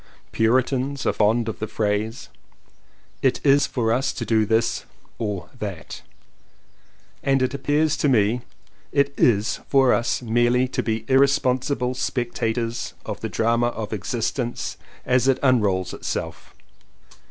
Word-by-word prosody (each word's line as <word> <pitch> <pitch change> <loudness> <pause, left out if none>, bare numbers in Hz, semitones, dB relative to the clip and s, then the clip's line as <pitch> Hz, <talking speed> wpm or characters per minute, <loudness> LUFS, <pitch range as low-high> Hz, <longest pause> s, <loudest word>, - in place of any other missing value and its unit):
Puritans 130 +4 +1
are - - +2
fond 110 +2 +2
of 110 - -4
the 110 - -3
phrase 105 +2 -2 0.9
"it 130 - +2
is 140 0 +5
for 115 -4 0
us 135 +3 0
to 115 - -4
do 110 -2 +2
this 115 +2 +1 0.4
or 105 -5 -3
that" 95 -8 -6 1.2
and 135 -1 +2
it 130 - 0
appears 150 +2 +1
to 150 - +1
me 115 0 +2 0.5
that 140 0 +2
it - - -26
is 105 -2 +2
for 135 -2 +5
us 120 +1 0
merely 120 +2 +2
to 125 - -2
be 110 -1 -2
irresponsible 130 -1 +2
spectators 120 -2 -2
of - - -5
the - - -4
drama 115 +1 +1
of 110 -2 -4
existence 120 +3 -3 0.3
as 125 0 +2
it 135 - +4
unrolls 100 -8 +2
itself. - - -5
120 Hz, 135 wpm, -23 LUFS, 110-130 Hz, 1.2 s, is